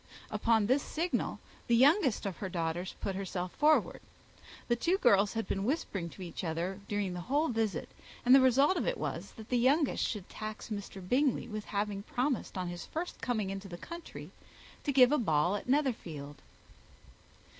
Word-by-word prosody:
Upon 225 -3 +2
this 260 +6 +3
signal, 340 +5 -2 0.3
the 235 - +4
youngest 275 - +4
of 195 -3 -3
her 190 - -4
daughters 170 +1 -2
put 195 - -2
herself 185 -2 -3
forward. 310 +1 +3 0.7
The 240 - +3
two 340 +10 +1
girls 205 - +4
had 225 -1 -2
been 195 - -1
whispering 205 - -2
to 185 - -10
each 175 +1 -6
other 175 +4 -2
during 205 -3 -1
the 180 - -5
whole 290 - +1
visit; 220 -7 -1 0.4
and 250 - +7
the 270 - +9
result 275 +7 +4
of - - -1
it - - 0
was, - - -4
that 220 -1 -11
the 245 - +2
youngest 280 +4 +3
should 205 -5 -3
tax 215 +1 -7
Mr. 195 -3 -6
Bingley 265 +4 +2
with 215 -1 -5
having 205 -1 -2
promised 250 0 -2
on 180 -1 -2
his 175 0 -6
first 340 +3 -5
coming 215 -6 -1
into 195 0 -6
the 175 -2 -7
country 340 - -9 0.5
to 285 - +1
give 255 -1 +6
a 300 - +3
ball 170 -3 +2
at 205 - -6
Netherfield. 170 - -1
215 Hz, 180 wpm, -32 LUFS, 190-265 Hz, 0.7 s, the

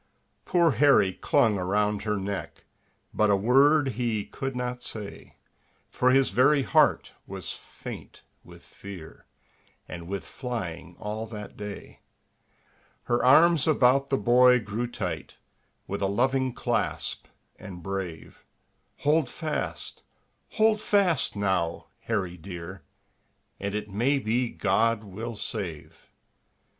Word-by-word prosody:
Poor 170 -3 +3
Harry 135 -8 +4
clung 105 +2 +2
around 105 +3 0
her 105 -1 -1
neck, 95 -4 -5 0.5
But 105 0 +2
a 100 - +5
word 135 +7 +4
he 115 -3 -2
could 135 -1 -5
not 125 0 -3
say, 105 -4 -7 0.6
For 125 - +2
his 135 +1 +4
very 135 +6 +4
heart - - +3 0.2
was - - -6
faint - - -10 0.2
with - - -15
fear, 95 -5 -11 0.6
And 85 -1 -8
with 100 +1 -4
flying 90 -9 -6
all 110 +2 -5
that 105 -2 -8
day. 105 -1 -8 1.0
Her 120 0 0
arms 155 +3 +6
about 135 -2 +3
the 135 - +2
boy 125 +1 +5
grew 110 +2 -3
tight, 100 -7 -5 0.5
With 100 +1 -4
a 100 - +2
loving 130 +5 +1
clasp, - - -2 0.3
and 95 -4 -9
brave; 95 -4 -6 0.6
"Hold 150 +1 +2
fast! 155 -2 -4 0.5
Hold 215 -1 +3
fast, 195 - +2
now, 95 -5 -1 0.2
Harry 95 -6 -2
dear, 90 +1 -8 0.8
And 100 +1 -3
it 105 0 -3
may 120 +8 +1
be 120 0 0
God 110 +3 +1
will 110 +4 -6
save." 90 -9 -6
110 Hz, 120 wpm, -27 LUFS, 100-130 Hz, 1.0 s, arms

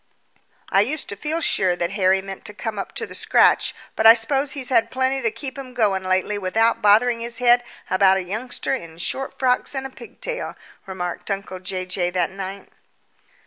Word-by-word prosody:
"I 195 - +5
used 280 +8 -2
to 200 - -3
feel 310 +10 -2
sure 185 - +2
that 175 0 -2
Harry 190 -1 +2
meant 195 -1 -8
to 210 - -7
come 215 -1 -4
up - - -6
to - - -1
the - - -11
scratch, - - +3 0.2
but 220 - +4
I 225 - +11
suppose 270 +5 0
he's 270 -4 -5
had 230 -3 +3
plenty 260 +1 0
to 230 - +2
keep 265 +3 -7
him 255 -2 -9
going 200 -5 +1
lately 185 +2 0
without 225 +5 +1
bothering 230 +3 +4
his 235 0 -4
head 245 0 +4 0.2
about 190 0 +4
a 190 - -2
youngster 220 +9 -3
in 170 -11 -6
short 265 +10 -3
frocks 255 +2 +1
and 270 0 -3
a 270 - -6
pigtail," - - -6 0.3
remarked 180 -1 -5
uncle 195 -2 -4
Jay 185 0 -4
Jay 180 -1 -1
that 180 +1 -1
night. 195 0 -7
210 Hz, 195 wpm, -22 LUFS, 190-250 Hz, 0.3 s, I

